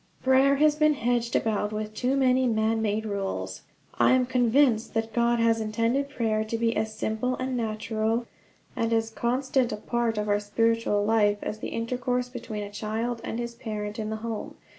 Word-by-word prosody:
Prayer 265 +2 +5
has 300 +1 +4
been 305 0 +3
hedged 240 -1 0
about 210 -1 0
with 215 0 -4
too 255 +5 0
many 260 -1 +3
man 220 0 +1
made 215 0 -1
rules. 200 -2 -3 0.4
I - - +5
am 255 -1 +3
convinced 245 -2 +2
that 225 0 -1
God 235 0 +2
has 230 -1 +3
intended 230 +6 0
prayer 220 -5 0
to 220 +1 -3
be 230 0 +1
as 220 0 -2
simple 220 +4 -1
and 255 0 -3
natural, 220 0 -1 0.5
and 230 0 0
as 225 0 +1
constant 255 +2 0
a 210 - -3
part 235 +1 -1
of 210 0 -1
our 205 0 +2
spiritual 210 0 +1
life, 210 -2 +3
as 215 - -4
the - - -4
intercourse 250 +2 -2
between 230 -4 -6
a 205 - -7
child 225 +3 -3
and - - -4
his 235 0 -4
parent 210 -2 -5
in 215 -1 -3
the 220 - -2
home. 225 -2 -5
230 Hz, 185 wpm, -27 LUFS, 215-245 Hz, 0.5 s, Prayer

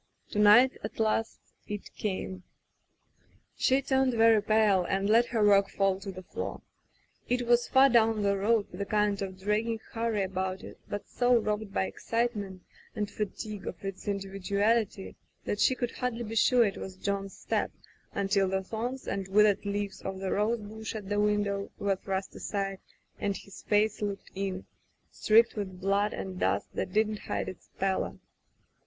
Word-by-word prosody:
To 210 - -1
night, 215 +5 +7
at 210 - -6
last, 220 0 0 0.3
it 210 -1 -6
came. 190 -2 -4 1.1
She 265 +1 +2
turned 265 -2 +2
very 225 -1 +5
pale 210 -3 +3
and 195 +3 0
let 230 +3 +5
her 220 -3 +1
work 200 -1 +5
fall 195 -1 +1
to 195 0 -6
the 185 0 -9
floor. - - -5 0.7
It 245 0 +1
was 240 0 +3
far 265 +1 +6
down 225 -4 +3
the 200 0 +2
road, 205 +2 +2
with 180 - -7
a - - -1
kind 210 -1 +1
of 190 -1 -5
dragging 215 +3 0
hurry 225 -3 0
about 190 0 -3
it, - - -10
but 205 - -5
so 245 0 +2
robbed 210 -1 -2
by 95 - 0
excitement 205 - -2 0.3
and 210 -1 -2
fatigue 210 0 -5
of - - -6
its 195 +1 -6
indi 200 -1 -2
viduality 200 +2 0 0.3
that 205 - -2
she 260 - +4
could 245 -2 -2
hardly 245 -2 -3
be 220 0 -6
sure 240 +2 +5
it 195 - -2
was 190 - -7
John's 195 0 -3
step - - -1 0.4
until 195 -1 +1
the 190 0 -1
thorns 240 +6 -4
and 195 -1 -2
withered 205 +1 +4
leaves 200 -1 -3
of 190 0 -4
the 190 0 -3
rosebush 220 0 -2
at 205 -3 -6
the 205 0 +1
window 205 -1 +1
were 200 -1 +1
thrust 190 0 -4
aside, 195 -2 -3 0.4
and 200 -1 -1
his 200 - -12
face 210 0 +1
looked 200 -1 -4
in, 190 -1 -3 0.5
streaked 225 +2 +4
with 190 -4 -5
blood 200 +2 +1
and 185 -1 -5
dust - - 0
that - - -3
did 215 +2 +3
not 215 -1 -4
hide - - -3
its 185 - -9
pallor. 190 0 -1
205 Hz, 175 wpm, -29 LUFS, 195-220 Hz, 1.1 s, night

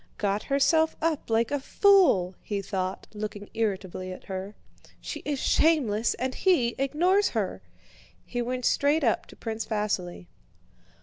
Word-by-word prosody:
"Got 205 0 0
herself 315 +3 +2
up 315 -5 -1
like 225 +2 +1
a 285 - 0
fool!" 320 - +4
he 200 -2 -3
thought, 185 -1 -3
looking 210 -1 -6
irritably 190 -4 -2
at 185 - -9
her. 190 +2 -6 0.4
"She - - -6
is 290 -2 -1
shameless, 245 -11 +2
and 260 +1 -2
he 335 -10 +2
ignores 350 +9 +2
her!" - - -2 0.6
He 245 - -3
went 250 +1 -3
straight 290 +2 +2
up 230 - +1
to - - -14
Prince 225 -1 -5
Vasíli. 205 - -2
230 Hz, 140 wpm, -27 LUFS, 205-290 Hz, 0.6 s, fool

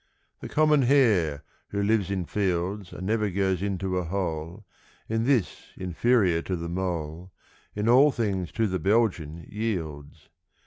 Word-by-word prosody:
= - - -45
The - - -7
common 150 -1 +4
hare, 105 - +3 0.3
who 100 0 -1
lives 100 -2 +1
in 95 -3 -2
fields 95 0 -2
And 95 - -7
never 105 0 +1
goes 95 -1 0
into 95 -2 -1
a - - -2
hole, 85 +1 -4 0.4
(In 115 +1 0
this 125 -8 0
inferior 90 0 +2
to 95 - -3
the 85 -1 -5
mole) 85 -1 -4 0.4
In 105 +1 -1
all 130 +5 +7
things 100 -8 -2
to 115 - +1
the 95 -3 -1
Belgian 90 -6 0
yields. 80 -10 -5
95 Hz, 150 wpm, -26 LUFS, 85-110 Hz, 0.4 s, all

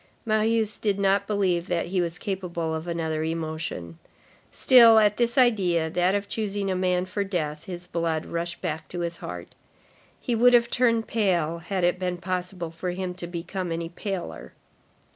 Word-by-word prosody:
Marius 220 -1 +1
did 205 -3 0
not 200 0 +2
believe 185 -4 0
that 175 -2 0
he 185 0 +1
was 170 0 -3
capable 175 -5 -3
of 160 +2 -4
another 160 -2 -2
emotion. 155 - -4 0.5
Still, 235 -3 +7
at 210 -1 +4
this 235 +2 0
idea, 185 -10 +3
that 180 +3 +2
of 200 0 -2
choosing 205 -3 -2
a - - 0
man 180 0 +1
for 200 +2 -2
death, 160 -5 -3
his 175 -1 -7
blood 165 -2 -2
rushed 170 +1 -4
back 160 -3 -3
to 175 - -5
his 170 0 -3
heart. 90 -1 -8 0.7
He 245 - -2
would 245 +2 +6
have 235 0 +3
turned 230 -2 +2
pale, 175 -7 +1
had 185 +2 -3
it 180 +1 +2
been 180 -1 -2
possible 180 -1 -4
for 170 +2 -4
him 180 0 -3
to 180 -1 -7
become 175 +1 -4
any 165 0 -3
paler. 190 +1 -6
180 Hz, 175 wpm, -25 LUFS, 170-205 Hz, 0.7 s, Still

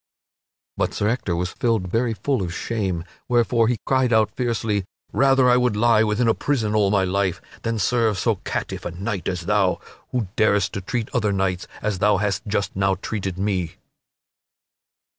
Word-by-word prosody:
But - - -1
Sir 105 - 0
Ector 115 -7 -1
was 90 +1 -2
filled 115 -6 0
very 115 +1 +1
full 125 +4 -1
of 90 -3 -3
shame, 95 -7 -2 0.2
wherefore 120 -1 +3
he 120 0 +1
cried 130 -2 +2
out 110 -2 +3
fiercely, 115 -5 -1 0.3
"Rather 135 -1 +4
would 125 -4 +1
I - - -1
lie 115 -1 +5
within 110 +2 +1
a 115 - +5
prison 115 -7 -1
all 105 -2 +3
my 100 -2 +3
life 95 -1 0 0.2
than 115 -1 -1
serve 110 0 +1
so - - +1
catiff - - -4
a - - -3
knight 95 +3 -4
as 90 -2 -2
thou, 95 0 +1 0.3
who 120 -5 -1
darest 105 -3 +2
to 100 - -3
treat 115 +4 -2
other 110 -4 +1
knights 95 -2 -1 0.2
as 105 -3 -1
thou 105 0 +4
hast 105 +1 -1
just 100 -1 -1
now 95 0 +2
treated 95 -1 -4
me." 95 -4 -1
105 Hz, 180 wpm, -23 LUFS, 95-115 Hz, 0.3 s, lie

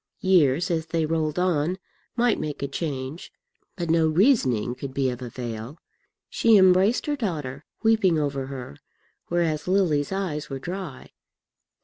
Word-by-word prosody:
Years 175 -2 +3
as 160 -1 -1
they 165 -1 0
rolled 155 -1 -1
on 180 -1 +1 0.4
might 240 -1 +2
make 150 -2 -4
a - - 0
change, 140 0 -5 0.4
but 170 -3 -2
no 165 -1 +4
reasoning 155 - +2
could 130 +1 -7
be 135 -2 +1
of 125 0 -7
avail. 120 +2 -6 0.5
She 225 -2 +4
embraced 190 +4 +4
her 295 - 0
daughter, 150 - -4 0.2
weeping 220 -7 +3
over 140 -3 -2
her, 130 - -8 0.5
whereas 165 -3 0
Lily's 175 -6 +2
eyes 185 -6 -3
were 135 - -4
dry. 175 +1 -7
160 Hz, 140 wpm, -25 LUFS, 135-185 Hz, 0.5 s, no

